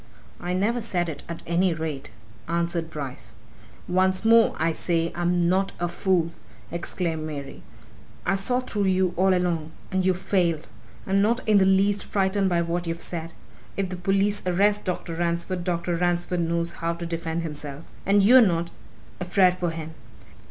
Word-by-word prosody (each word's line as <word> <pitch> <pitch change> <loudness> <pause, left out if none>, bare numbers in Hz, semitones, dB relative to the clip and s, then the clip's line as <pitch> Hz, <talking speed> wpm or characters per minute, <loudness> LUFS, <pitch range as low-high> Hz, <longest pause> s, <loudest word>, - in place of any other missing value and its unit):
"I 175 +1 -3
never 220 +6 +1
said 175 -6 -1
it, 145 -3 -6
at 170 - -6
any 170 +1 +2
rate," 155 -3 -4 0.4
answered 170 0 -1
Bryce. 140 -5 -7 0.5
"Once 185 +2 +1
more, 230 0 +5
I 165 +1 +1
say, 165 0 -1
I'm 175 0 +1
not 190 +2 +1
a 175 - 0
fool!" 175 -1 0 0.4
exclaimed 170 -1 -2
Mary. 145 -3 -6 0.6
"I 195 - +2
saw 245 +6 +1
through 210 -5 -2
you 185 -1 +2
all 190 +2 +3
along. 170 -3 0 0.2
And 190 -1 +1
you've 185 -1 +2
failed! 175 -5 0 0.4
I'm 195 +1 +2
not 230 +4 +1
in 210 -2 +5
the 190 - +4
least 195 +1 +3
frightened 195 0 +1
by 170 -1 +2
what 170 +1 -2
you've 165 0 -3
said. 165 -1 -5 0.4
If 195 -2 -1
the 185 - -4
police 195 +3 +2
arrest 205 +3 +2
Dr. 180 -2 -3
Ransford, 170 +2 -2
Dr. 175 -1 -1
Ransford 175 +1 0
knows 170 0 0
how 165 0 -2
to 170 0 -6
defend 165 0 -3
himself. 150 -1 -6 0.2
And 200 +1 +4
you're 250 +5 +8
not 170 -5 +1 0.5
afraid 180 0 +3
for 175 -1 0
him! 160 -1 -6
175 Hz, 165 wpm, -25 LUFS, 170-190 Hz, 0.6 s, you're